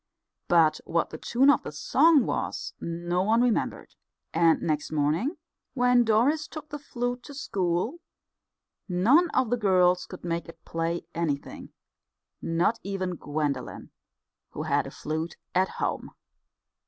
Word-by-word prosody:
But 165 -3 +4
what 165 0 -1
the 155 - -7
tune 270 +4 +4
of 270 - +2
the - - -7
song 280 - +4
was - - -3
no 175 +1 -2
one 225 +5 +3
remembered; 245 -3 -1 0.4
and 165 0 +4
next 150 -2 -2
morning 155 - 0 0.4
when 250 -1 +4
Doris 250 +8 +2
took 310 -1 -9
the 295 - -6
flute 245 -3 -3
to 285 +4 -11
school, 195 - -1 0.9
none 245 - +4
of 255 -5 0
the 245 - +2
girls 180 -4 +3
could 185 - -10
make 170 -1 -3
it 165 0 -14
play 165 +1 -2
anything, 155 -4 -3 0.7
not 170 +8 +1
even 190 -2 -3
Gwendolen, 150 -2 -3 0.6
who - - -4
had - - 0
a - - -8
flute 160 +2 -4 0.2
at 185 +1 +2
home. - - -3
185 Hz, 140 wpm, -27 LUFS, 165-245 Hz, 0.9 s, But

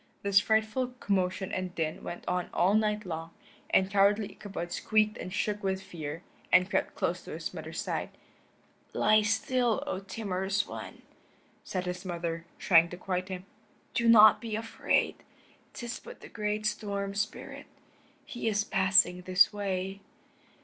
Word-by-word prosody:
This 200 -1 +5
frightful 220 +4 0
commotion 190 -1 0
and 185 -1 -3
din 155 -1 -2
went 175 - -7
on 180 0 -1
all 185 +3 +3
night 210 -1 +1
long, 165 -1 -6 0.3
and 190 0 +3
cowardly 200 +1 +3
Ichabod 190 -4 -6
squeaked 215 +1 +1
and 185 - -6
shook 210 +1 -1
with 190 -2 -1
fear, 160 0 -7 0.3
and 180 0 +6
crept - - -1
close - - -1
to - - -7
his - - -5
mother's - - -6
side. - - -2 0.8
"Lie 215 0 +4
still, 235 +4 +1
O 285 -10 -3
timorous 195 -1 -2
one," - - -8 0.6
said 185 -1 -3
his 180 0 -4
mother, 170 -2 -4
trying 170 -3 +5
to 175 - -7
quiet 185 0 -3
him. 185 0 -6 0.5
"Do 235 0 +2
not 215 -2 +8
be 225 -3 -3
afraid; 225 +1 0 0.6
'tis 240 -1 -5
but - - -12
the - - -11
great 210 0 -2
Storm 200 -2 -2
Spirit. 205 +2 -4 0.6
He 240 -2 -5
is 210 -1 +2
passing 190 -2 +3
this 185 +3 +4
way." 195 -1 -3
195 Hz, 150 wpm, -30 LUFS, 180-215 Hz, 0.8 s, not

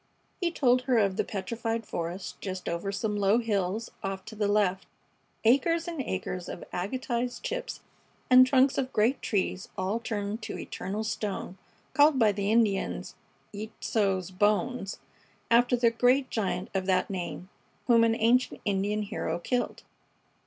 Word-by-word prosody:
He 350 -3 +1
told 255 -6 +3
her 250 - +4
of 200 -3 +2
the - - +1
petrified 225 +3 -3
forest 175 +1 -5
just 185 -2 -5
over 170 +4 -2
some 210 +1 -2
low 205 +1 +3
hills 215 -2 -1
off 195 -1 -4
to 220 0 -9
the 210 -1 0
left; 200 -2 +1 0.6
acres 330 +8 +3
and 335 -4 -3
acres 185 -5 -4
of - - -7
agatized 245 - -2
chips - - -4 0.5
and 255 0 +8
trunks 265 +1 +4
of 260 -1 -2
great 230 +6 +2
trees 190 -2 -1
all 190 +4 -1
turned 215 -1 -3
to - - -5
eternal 205 +3 -4
stone, 200 -3 -4 0.3
called 295 -1 +5
by 220 -4 +5
the 200 +1 -1
Indians 220 -4 +1 0.4
"Yeitso's 200 -3 -1
bones," 210 +2 0 0.5
after 245 +1 +5
the 235 -1 +3
great 250 +3 +2
giant 195 -4 -2
of 190 -1 -1
that 185 +1 +2
name 185 0 -5 0.4
whom 235 -2 +5
an 225 0 +3
ancient 240 +3 +2
Indian 205 +1 0
hero 200 - -3
killed. 245 +8 -2
215 Hz, 150 wpm, -28 LUFS, 195-245 Hz, 0.6 s, and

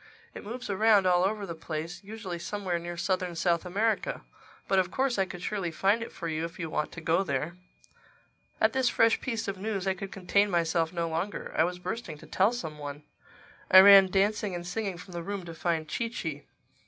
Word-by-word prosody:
It - - -9
moves 245 +4 -6
around 205 0 +4
all 180 -1 +4
over 205 +1 0
the 170 - -5
place—usually 175 +5 -6
somewhere 185 -2 -2
near 175 0 -6
southern 180 0 -1
South 170 +1 +1
America. 220 - 0 0.4
But 195 - +3
of 185 -1 +1
course 260 +2 0
I 195 - +3
could 180 -1 -9
surely 200 -5 -2
find 195 +7 +1
it 230 - -6
for 170 - -6
you 160 0 -2
if 165 +3 -6
you 165 -4 -5
want 150 - -1
to 165 - -8
go 165 +3 +2
there." 150 0 -2 1.0
At - - +3
this 260 -2 +2
fresh 225 0 +3
piece 230 -4 -3
of 195 -1 -4
news 200 -2 -2
I 190 - +2
could 195 0 -7
contain 200 +2 +2
myself 165 -2 +1
no 170 -2 -2
longer. 170 +4 -3
I 160 - +4
was 180 +1 -3
bursting 180 -2 -5
to - - -14
tell 195 +4 +2
some 160 -11 -6
one. 145 0 -7 0.7
I 185 - +8
ran 195 -1 +9
dancing 200 0 +1
and 175 0 -5
singing 195 0 -3
from 180 +1 -11
the 170 - -4
room 195 +1 -5
to 165 - -7
find 165 -1 -1
Chee 230 +8 -2
Chee. 160 -10 -5
185 Hz, 210 wpm, -29 LUFS, 170-205 Hz, 1.0 s, ran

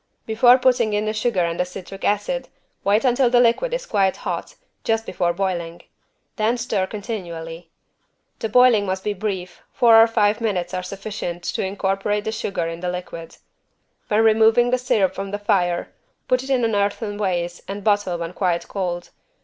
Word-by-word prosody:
Before 240 +3 +5
putting 245 -4 +2
in 210 +1 0
the 215 - -1
sugar 215 -3 0
and 170 0 -3
the - - +3
citric 185 +1 -9
acid - - -1 0.3
wait 205 +5 +2
until 250 0 +3
the 245 0 +4
liquid 245 - +3
is - - -3
quite 195 -3 +1
hot, - - -5 0.3
just 225 0 0
before 175 -1 0
boiling. 175 -2 -3 0.5
Then 225 +2 +1
stir 210 -5 -1
continually. 175 -6 -6 0.7
The 225 - -3
boiling 235 -3 +5
must 190 0 -2
be 210 - -1
brief, 190 -3 -5
four 225 -2 +6
or 225 - +6
five 215 -1 +1
minutes 185 -5 -1
are 185 - -2
sufficient 185 -2 -6
to - - -1
incorporate 195 +1 -1
the 220 - -2
sugar 195 -6 -3
in 165 0 -5
the 180 0 -3
liquid. 175 -2 -7 0.7
When 215 0 +2
removing 225 +2 +4
the 255 - +2
syrup 215 -7 +1
from 195 0 -5
the 205 - -3
fire, 180 -4 0 0.3
put 255 0 +2
it 265 - -9
in 255 -3 +2
an 225 - 0
earthen 205 +1 -1
vase 175 -3 -2
and 200 +1 -6
bottle 205 -4 +1
when 170 +1 -5
quite 180 -3 -1
cold. 175 -3 -4
205 Hz, 180 wpm, -22 LUFS, 180-225 Hz, 0.7 s, four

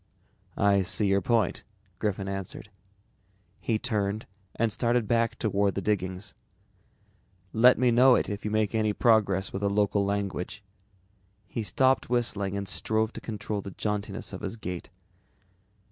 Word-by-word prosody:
"I 100 -1 +4
see 100 +3 +1
your 100 0 +3
point," 115 +3 +1 0.4
Griffin 100 -2 -2
answered. 95 +1 -6 0.9
He 115 - 0
turned 105 -2 -1 0.3
and 115 -1 +1
started 120 0 +1
back 115 0 +1
toward 100 -3 +1
the 100 - -1
diggings. 95 -1 -2 1.2
"Let 125 +3 +6
me 125 -1 +3
know 125 +2 +6
it 105 0 -2
you 105 - -2
make 110 0 0
any 110 -2 +1
progress 100 -5 +2
with 95 - -3
the 100 - +1
local 100 0 +2
language." 100 +1 -3 0.8
He 115 - -4
stopped 130 +3 +2
whistling 100 -5 0
and 100 -1 -4
strove 110 +3 0
to - - -8
control 105 -2 -4
the 100 - -7
jauntiness 105 +1 -3
of - - -6
his - - -4
gait. 90 -4 -6
105 Hz, 145 wpm, -28 LUFS, 100-115 Hz, 1.2 s, Let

